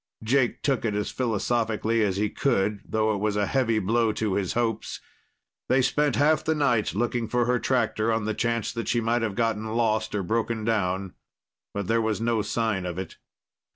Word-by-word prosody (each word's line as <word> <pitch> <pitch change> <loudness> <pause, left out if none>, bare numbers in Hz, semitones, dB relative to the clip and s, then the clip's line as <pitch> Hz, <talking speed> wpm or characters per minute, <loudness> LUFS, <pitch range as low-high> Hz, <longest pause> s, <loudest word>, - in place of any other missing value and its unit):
Jake 125 +2 +1
took 135 -4 +1
it 110 -3 -1
as 105 0 -2
philosophically 115 -1 0
as 100 -3 +1
he 105 +1 +1
could, 105 -6 0
though 110 0 0
it 100 - -2
was 105 0 0
a 105 0 +1
heavy 115 -2 +1
blow 110 +3 +2
to 105 -2 -1
his 95 -2 -1
hopes. 115 -2 -2 0.7
They 130 0 +4
spent 145 +1 +1
half 155 +2 +3
the 160 - +1
night 120 -10 +1
looking 120 +1 0
for 120 +1 +1
her 125 0 +1
tractor, 115 -3 +1
on 110 -2 0
the 110 - -1
chance 115 0 -1
that 115 -1 -4
she 120 - +2
might 115 +1 +1
have 110 -3 -2
gotten 110 -1 0
lost 110 -2 +1
or 100 - -1
broken 110 +2 -1
down, 95 -4 -1 0.6
but 100 -1 -3
there 115 +4 +2
was 110 -1 -1
no 115 -1 +1
sign 105 -2 -1
of 90 0 -5
it. 95 -2 -6
110 Hz, 195 wpm, -26 LUFS, 105-120 Hz, 0.7 s, They